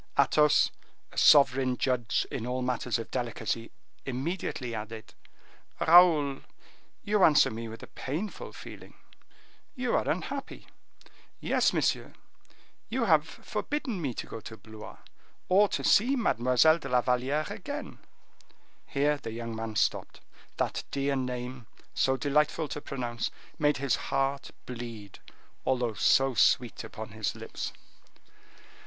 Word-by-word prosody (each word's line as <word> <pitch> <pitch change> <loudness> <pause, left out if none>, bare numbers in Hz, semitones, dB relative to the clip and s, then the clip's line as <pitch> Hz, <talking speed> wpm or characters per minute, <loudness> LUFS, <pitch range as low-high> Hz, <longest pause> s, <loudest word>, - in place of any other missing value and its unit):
Athos, 150 -1 +4 0.4
a - - -15
sovereign 135 -4 +5
judge 120 -5 0
in 125 -4 -4
all 125 +1 -2
matters 125 -2 -1
of 115 - -7
delicacy, 120 -2 -3 0.3
immediately 135 -2 -3
added, 110 0 -7 0.7
"Raoul, 160 -5 +6 0.6
you 205 -1 +2
answer 150 -3 +6
me 115 +1 -5
with 115 0 -9
a - - -9
painful 165 +11 -5
feeling; - - -11 0.8
you 250 -2 -1
are - - 0
unhappy." - - -4 0.7
"Very, - - 0
monsieur; - - 0 0.8
you - - 0
have - - +4
forbidden 255 -10 -4
me 135 -6 -2
to - - -4
go 115 - -7
to 110 0 -10
Blois, 110 -1 -11 0.5
or 200 +3 +5
to - - -3
see 250 +7 +4
Mademoiselle 155 - +3
de 135 - -7
la 125 0 +3
Valliere 130 +5 0
again." 285 +9 -6 0.9
Here 145 +1 +1
the 140 - -7
young 115 0 -5
man 110 -1 -5
stopped. - - 0 0.4
That - - -1
dear 140 0 0
name, 125 -2 -4 0.3
so 130 0 +2
delightful 150 +3 +1
to 150 - -5
pronounce, 120 -5 -3 0.3
made 150 -1 +3
his 140 -2 +1
heart 135 0 0 0.2
bleed, 115 -5 -8 0.4
although 125 -3 0
so 135 +5 +3
sweet 120 -1 +2
upon 110 0 -8
his 110 +1 -3
lips. - - -6
130 Hz, 130 wpm, -29 LUFS, 120-150 Hz, 0.9 s, Raoul